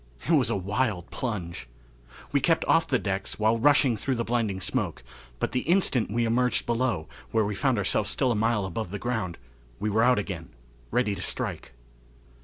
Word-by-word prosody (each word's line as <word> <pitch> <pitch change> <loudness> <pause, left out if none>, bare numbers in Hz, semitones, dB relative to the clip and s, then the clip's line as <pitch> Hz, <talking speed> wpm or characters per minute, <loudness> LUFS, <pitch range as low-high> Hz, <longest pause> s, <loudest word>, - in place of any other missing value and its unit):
It - - +1
was - - +4
a - - +1
wild 100 -1 -1
plunge. 90 - -4 0.6
We 140 - +3
kept 165 +4 +2
off 165 - +3
the 130 - +2
decks 95 -3 -3
while 110 +2 +2
rushing 140 -1 +4
through 130 +4 -1
the 115 - -1
blinding 115 -5 -1
smoke, 90 - -2 0.4
but - - -1
the 125 - +1
instant 165 - +2
we 115 +3 +1
emerged 125 +2 +1
below, 120 -9 0 0.2
where 110 -2 +2
we 105 - -2
found 130 +4 +1
ourselves 100 +1 +1
still 130 -3 +1
a - - +1
mile 110 -1 +1
above 95 +2 -4
the 100 - -4
ground, 105 -7 -2 0.4
we 105 +2 -1
were 110 +2 +3
out 125 +2 +5
again, 95 -5 -4 0.4
ready 120 -3 +1
to 90 - -5
strike. - - -2
110 Hz, 190 wpm, -27 LUFS, 100-125 Hz, 0.6 s, out